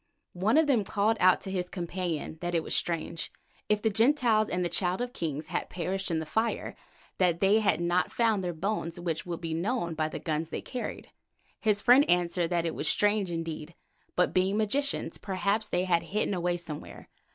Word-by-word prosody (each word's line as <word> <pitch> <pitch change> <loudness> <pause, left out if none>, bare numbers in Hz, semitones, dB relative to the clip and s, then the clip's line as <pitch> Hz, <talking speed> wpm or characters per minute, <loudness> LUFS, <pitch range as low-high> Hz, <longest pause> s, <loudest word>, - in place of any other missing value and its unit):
"One 200 +9 +2
of 320 - +5
them 255 -7 +3
called 210 +3 +1
to 185 +1 +4
his 180 -2 -2
companion 175 -3 -3
that 175 0 -2
it 165 - +1
was - - -1
strange, 165 -1 -2 0.4
if 210 0 +2
the 220 - +3
Gentiles 225 -1 +3
and 180 0 0
the - - +3
Child 180 +1 0
of 245 0 -3
Kings 155 -2 -4
had - - -2
perished 190 +2 -3
in 165 - 0
the 160 - -2
fire, 220 +8 -1 0.4
that 175 -3 +3
they 200 +3 +4
had 195 -7 +2
not 175 +1 +1
found 225 -5 +2
their 175 - -1
bones 175 -1 -3
which 170 -1 -3
would 170 -1 -4
be 165 -1 -3
known 175 +1 -1
by 155 -1 -1
the - - -5
guns 160 0 -2
they - - -3
carried. 250 - -6 0.5
His 210 -2 +1
friend 255 +4 +6
answered 175 -1 +2
that 170 -1 0
it 165 - -1
was - - -3
strange 205 -2 +2
indeed, 165 -1 -5 0.4
but 180 - +2
being 190 +2 +2
magicians, 275 +7 0
perhaps 200 +2 -1
they 180 - +1
had 175 -2 +2
hidden 210 0 -1
away 175 -1 0
somewhere. 160 -4 -8
180 Hz, 195 wpm, -29 LUFS, 170-210 Hz, 0.5 s, friend